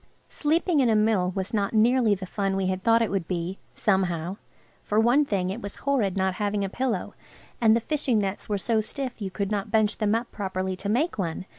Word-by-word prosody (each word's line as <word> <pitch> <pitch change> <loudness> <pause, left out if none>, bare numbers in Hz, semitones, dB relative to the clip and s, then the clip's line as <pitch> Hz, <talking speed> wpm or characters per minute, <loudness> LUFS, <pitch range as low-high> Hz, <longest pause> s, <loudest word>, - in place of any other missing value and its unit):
Sleeping 320 +1 +1
in 255 -3 +4
a 220 - +3
mill 210 -4 +2
was 195 +3 -3
not 205 0 0
nearly 230 -1 +4
the 190 0 -7
fun 195 +1 -1
we 195 -1 0
had 185 0 -1
thought 230 +3 +4
it 225 - -2
would 190 -4 -1
be–somehow. 180 0 -1 0.4
For 210 - 0
one 245 +6 +4
thing, 190 -7 -1
it 220 +5 -5
was 200 - -6
horrid 235 -9 0
not 190 0 +1
having 205 -1 0
a - - -3
pillow, 235 -3 -2 0.5
and 220 -1 +6
the 230 - +1
fishing 275 -3 0
nets 200 0 -2
were 205 - +1
so 220 +3 +1
stiff 250 +2 -5
you 195 - -2
could 200 +1 -3
not 205 0 -2
bunch 215 -1 +1
them 215 0 +2
up 235 +1 -3
properly 190 -2 -3
to 200 +2 -5
make 260 +6 0
one. 170 0 -3
205 Hz, 220 wpm, -26 LUFS, 190-230 Hz, 0.5 s, and